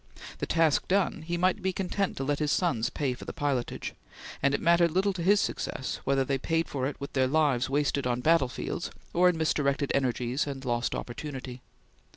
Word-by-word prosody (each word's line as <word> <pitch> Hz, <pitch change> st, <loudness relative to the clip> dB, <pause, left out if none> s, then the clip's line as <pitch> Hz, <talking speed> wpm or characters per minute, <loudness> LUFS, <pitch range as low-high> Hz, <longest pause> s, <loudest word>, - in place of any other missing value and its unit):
The -, -, -2 dB
task 165 Hz, -3 st, +2 dB
done, 190 Hz, -3 st, +1 dB
he 170 Hz, +2 st, -3 dB
might 185 Hz, +4 st, +2 dB
be 190 Hz, +1 st, 0 dB
content 195 Hz, +1 st, -2 dB
to 135 Hz, -, -2 dB
let 145 Hz, +1 st, 0 dB
his 150 Hz, -1 st, +1 dB
sons 115 Hz, -11 st, +1 dB
pay 140 Hz, -4 st, -1 dB
for 125 Hz, -, -10 dB
the -, -, -6 dB
pilotage; 140 Hz, -4 st, -2 dB, 0.5 s
and 140 Hz, +1 st, +3 dB
it -, -, -1 dB
mattered 170 Hz, 0 st, +4 dB
little 190 Hz, +4 st, +1 dB
to 180 Hz, -, -5 dB
his 200 Hz, +4 st, +4 dB
success 130 Hz, -, -3 dB
whether 135 Hz, -1 st, +2 dB
they 135 Hz, 0 st, 0 dB
paid 165 Hz, +4 st, 0 dB
it 135 Hz, 0 st, -2 dB
with 140 Hz, -, -7 dB
their 130 Hz, -1 st, +3 dB
lives 135 Hz, -3 st, +2 dB
wasted 140 Hz, -1 st, +1 dB
on 125 Hz, 0 st, 0 dB
battle 155 Hz, -3 st, +4 dB
fields -, -, -4 dB, 0.2 s
or 180 Hz, +1 st, +5 dB
in 175 Hz, -, 0 dB
misdirected 145 Hz, -3 st, +1 dB
energies 130 Hz, +1 st, 0 dB
and 135 Hz, -1 st, -5 dB
lost 120 Hz, 0 st, 0 dB
opportunity. 130 Hz, -1 st, -6 dB
145 Hz, 195 wpm, -28 LUFS, 130-170 Hz, 0.5 s, or